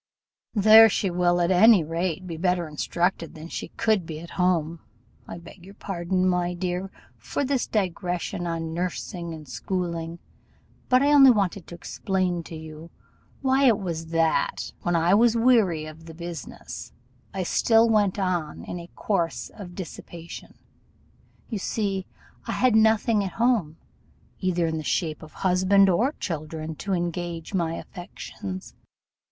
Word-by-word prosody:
There 220 +2 +8
she 195 -2 0
will, 175 0 +2
at 175 +1 +2
any 190 0 +6
rate, 170 +3 -2
be 170 -2 -5
better 175 0 0
instructed 170 +3 -2
than 160 +1 -9
she - - -5
could 215 -4 +2
be 160 -1 -7
at 170 +1 -10
home. 170 -3 0 0.5
I - - -7
beg 170 +1 -13
your 195 +2 -13
pardon, 185 -1 -1
my 180 -1 0
dear, 180 +1 -3 0.3
for 285 - -3
this 265 -2 0
digression 180 -3 -2
on 165 -1 -3
nursing 175 0 -4
and 155 -2 -9
schooling; 170 +3 -3 0.7
but 255 +1 +5
I 290 +1 +4
wanted 270 -5 +8
only 200 -1 0
to 175 - -8
explain 185 0 -2
to 165 - -8
you 160 +1 -10 0.5
why 265 +1 +3
it 230 -5 +5
was 165 -5 -4
that, 165 -1 0
when 175 0 0
I 170 +2 +3
was 230 +2 +4
weary 220 -10 +3
of 155 +1 -11
the 160 - -10
business, 170 -4 -8 0.4
I 190 -1 -3
still 225 +5 +4
went 210 -4 +2
on 180 -6 -2
in 175 - -6
a 170 0 -10
course 170 -6 -1
of 180 -4 -10
dissipation. 170 -2 -9 0.9
You 220 - -4
see 195 -2 -2 0.4
I - - -1
had 255 -3 +3
nothing 220 -1 +4
at 190 - -4
home, 225 -10 +1 0.6
either 180 -3 0
in 160 -1 -1
the 155 - -4
shape 155 0 -1
of 155 - -11
husband 190 +2 +4
or 235 - +2
children, 160 - -5
to 195 - -3
engage 175 0 -3
my 165 -3 0
affections. 100 - -8
180 Hz, 155 wpm, -25 LUFS, 165-200 Hz, 0.9 s, There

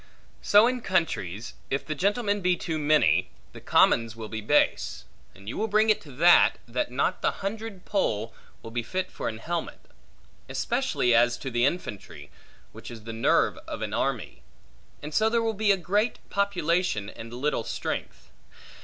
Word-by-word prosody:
So 205 +2 +6
in 250 0 0
countries, 120 - -1 0.2
if 140 - -2
the 155 - -3
gentlemen 205 +4 0
be 180 -1 +2
too 160 -2 -3
many, 150 0 +3 0.2
the - - -11
commons 115 -1 +3
will 110 -1 -7
be 110 -1 -5
base; 105 - +1 0.3
and 100 +1 -16
you 115 - -4
will 220 - 0
bring 215 +1 +4
it 215 - 0
to 150 - -13
that, 170 +6 +5
that 120 +1 -2
not 140 +8 -1
the - - -1
hundred 215 -2 -5
poll, 115 - -1 0.3
will 115 - -8
be 120 +1 -1
fit 185 +11 -3
for - - -3
an 110 - -6
helmet; 165 +8 -4 0.7
especially 120 - 0
as 120 +1 +4
to 135 - -6
the 120 +2 +3
infantry, 100 - -6 0.4
which - - -10
is 115 -3 -10
the 115 +1 -7
nerve 115 - +2
of - - -5
an - - -4
army; - - -2 0.6
and 150 +1 -6
so 220 +5 +3
there 230 0 +1
will 225 -1 0
be 205 -1 +3
great 205 +6 0
population, 180 - 0
and 115 +2 -9
little 125 0 -1
strength. - - -5
155 Hz, 170 wpm, -26 LUFS, -, 0.7 s, So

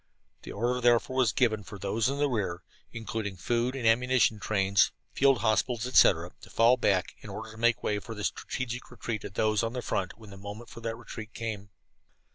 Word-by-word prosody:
The - - -9
order 120 +4 0
was - - -4
therefore 120 +2 +3
given 110 -5 +2
for 100 +1 -10
those 105 +5 0
in 140 - -2
the 145 0 +2
rear, 100 -9 -2 0.3
including 110 -3 -4
food 120 +7 0
and 130 -4 -4
ammunition 120 -1 +3
trains, 100 -2 +3 0.2
field 135 -5 +4
hospitals, 115 +2 +1
etc., 90 -8 +4
to - - -13
fall 115 +2 +5
back, 100 -7 +1
in - - -11
order 110 0 -7
to 110 - -13
make 120 -1 +2
way 105 -1 0
for 110 +3 -8
the 105 - -6
strategic 125 +1 -3
retreat 110 -4 -5
of 95 - -8
those 110 -1 +2
on 115 0 -2
the 125 -1 -4
front 95 0 -2
when 110 -3 -13
the 100 - -10
moment 105 +4 -9
for - - -9
that 115 -1 -3
retreat 110 0 -9
came. 105 -3 -5
115 Hz, 205 wpm, -29 LUFS, 105-120 Hz, 0.3 s, fall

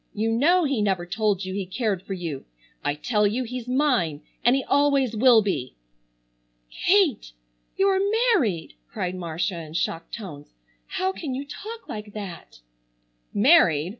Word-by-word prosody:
You 220 +2 0
know 335 +10 +4
he 275 -7 0
never 190 -4 0
told 200 0 0
you 185 - -4
he 195 -1 -3
cared 200 -2 -1
for 195 - -6
you. 165 -7 -5 0.4
I 145 0 0
tell 210 +5 +1
you 235 +5 -1
he's 250 0 -6
mine, 250 - +1 0.2
and 240 +2 +5
he 270 - 0
always 280 -4 +2
will 230 -1 +6
be." 140 -11 -3 1.0
"Kate, 350 - +2 0.4
you're 385 0 +3 0.3
married!" 205 - 0 0.2
cried 180 0 -3
Marcia 175 +1 -3
in 155 -1 -10
shocked 165 0 -2
tones. 155 -10 -9 0.4
"How 375 0 -1
can 295 -8 -5
you 275 +2 -4
talk 445 +10 -9
like 210 -1 -7
that?" 190 - -8 0.7
"Married! 200 - +4
210 Hz, 150 wpm, -25 LUFS, 180-270 Hz, 1.0 s, will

